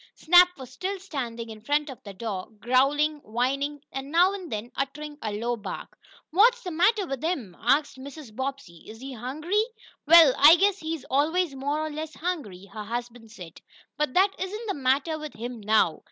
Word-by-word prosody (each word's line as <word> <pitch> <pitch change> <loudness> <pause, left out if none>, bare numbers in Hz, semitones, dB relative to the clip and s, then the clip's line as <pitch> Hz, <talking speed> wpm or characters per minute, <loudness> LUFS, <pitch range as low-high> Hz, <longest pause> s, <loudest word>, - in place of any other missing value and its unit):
Snap 360 +1 +5
was 260 -2 -10
still 375 +9 -4
standing 235 -10 -5
in 215 -1 -11
front 290 +5 0
of 265 -4 -9
the 200 - -9
door, 195 -3 -5
growling, 275 +6 +2
whining, 275 +4 -2
and, 270 +1 -6
now 355 +4 +4
and 375 -4 -7
then, 215 +3 -5
uttering 295 +2 -4
a 215 - -3
low 235 +3 -1
bark. 220 - -8 0.4
"What's 470 +8 +4
the 360 - -5
matter 385 +5 +2
with 270 -4 -5
him?" 270 - -2
asked 275 +3 +1
Mrs. 275 -4 -10
Bobbsey. 260 -10 -6
"Is 220 +1 -10
he 265 +1 -7
hungry?" 305 - -1 0.4
"Well, 325 -4 +8
I 300 +4 +9
guess 400 +2 +2
he's 315 -4 -5
always 315 +4 +1
more 285 +3 -2
or 310 - -5
less 310 +1 -6
hungry," 280 - -4
her 215 - -6
husband 240 0 -6
said, 180 -6 -12 0.3
"but 300 -4 -2
that 385 +2 +5
isn't 420 +5 -4
the 400 - 0
matter 280 +2 0
with 305 -1 -8
him 240 +1 -6
now. 210 -6 +2
280 Hz, 185 wpm, -26 LUFS, 240-330 Hz, 0.4 s, I